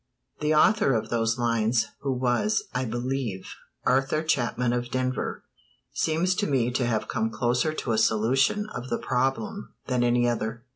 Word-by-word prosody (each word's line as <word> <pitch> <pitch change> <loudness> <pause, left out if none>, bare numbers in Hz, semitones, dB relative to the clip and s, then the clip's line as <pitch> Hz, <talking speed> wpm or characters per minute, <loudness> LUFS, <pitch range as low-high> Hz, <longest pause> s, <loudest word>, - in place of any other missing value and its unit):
The 150 +1 +1
author 200 -2 +4
of 110 0 -2
those 115 0 0
lines, 115 -1 +1
who 140 - -2
was, 125 - +1
I 125 +1 -1
believe, 120 -4 -3 0.4
Arthur 135 +4 +2
Chapman 125 -5 0
of 120 0 -2
Denver, 130 0 -2 0.5
seems 165 +4 +1
to 205 - 0
me 125 -4 +1
to 125 0 0
have 110 -2 -1
come 110 - -1
closer 125 +6 0
to 130 - -3
a 110 - +2
solution 130 - +2
of 125 +1 -6
the 120 - 0
problem 125 -3 -2
than 125 -1 0
any 120 0 +3
other. 115 0 -2
125 Hz, 160 wpm, -26 LUFS, 115-135 Hz, 0.5 s, author